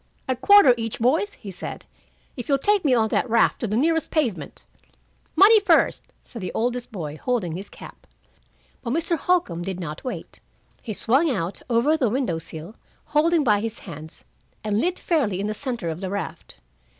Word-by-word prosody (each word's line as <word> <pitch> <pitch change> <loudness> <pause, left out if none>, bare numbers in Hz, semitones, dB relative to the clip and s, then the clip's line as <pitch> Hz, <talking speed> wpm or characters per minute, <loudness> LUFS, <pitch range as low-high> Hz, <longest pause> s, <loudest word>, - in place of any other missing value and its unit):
"A 260 - +1
quarter 270 +2 +7
each, 225 -1 -3
boys," 315 - +1
he 200 - -10
said, 180 - -7 0.5
"if 245 0 -7
you'll 275 - +4
take 410 +7 +2
me 270 -5 +3
on 220 -2 +2
that 250 - 0
raft 230 0 +3
to 230 - -2
the 215 +2 -1
nearest 325 +4 +1
pavement." 220 - -2 0.7
"Money 410 +6 +7
first," 410 - +3 0.2
said 235 - -10
the 185 - -4
oldest 245 +1 -2
boy, 155 -7 -6
holding 220 -10 -1
his 195 +3 -7
cap. - - -13 0.7
But 235 -1 -3
Mr. 335 +2 0
Holcombe 325 - 0
did 185 0 -4
not 155 -3 -6
wait. 255 - -6 0.4
He 220 - -5
swung 265 - +2
out 190 -7 -3
over 245 +6 +3
the 260 -8 +1
window 235 -9 -1
sill, 165 +4 -9 0.3
holding 315 +1 +2
by 210 -5 +3
his 225 +1 -3
hands, 160 -3 -11 0.4
and 210 0 0
lit 360 +4 0
fairly 235 - 0
in 200 - -2
the 210 - -1
center 240 -5 -4
of 160 +3 -5
the 190 - -3
raft. 200 - -6
235 Hz, 185 wpm, -23 LUFS, 195-295 Hz, 0.7 s, quarter